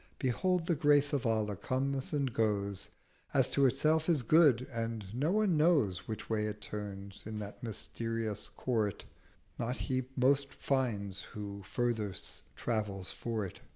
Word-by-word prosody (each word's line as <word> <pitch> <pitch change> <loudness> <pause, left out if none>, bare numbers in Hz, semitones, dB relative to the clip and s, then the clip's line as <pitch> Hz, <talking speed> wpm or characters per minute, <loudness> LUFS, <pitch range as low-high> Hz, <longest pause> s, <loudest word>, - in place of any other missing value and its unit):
Behold 165 +7 +1
the 170 - +2
Grace 145 -1 +4
of 135 -4 +1
Allah 110 -2 +1
comes 135 +6 0
and 140 -5 0
goes 100 -3 0 0.5
As - - +5
to 140 -1 +5
Itself 155 +5 +2
is 155 -7 +3
good: 140 -3 +5
and 115 -2 -2
no 145 +8 +1
one 205 -5 +3
knows 140 - +3
Which 110 - -5
way 105 -1 0
it 105 0 -5
turns: 100 -2 -6
in 110 -1 -4
that 105 -1 -7
mysterious 115 -1 -3
Court 110 -6 -1 0.5
Not 125 +2 -1
he 130 -1 -1
most 135 +2 +3
finds 105 -8 -1
who 100 0 -7
furthest 110 -1 -2
travels 105 -5 -2
for't. 110 -5 -4
115 Hz, 145 wpm, -33 LUFS, 105-140 Hz, 0.5 s, As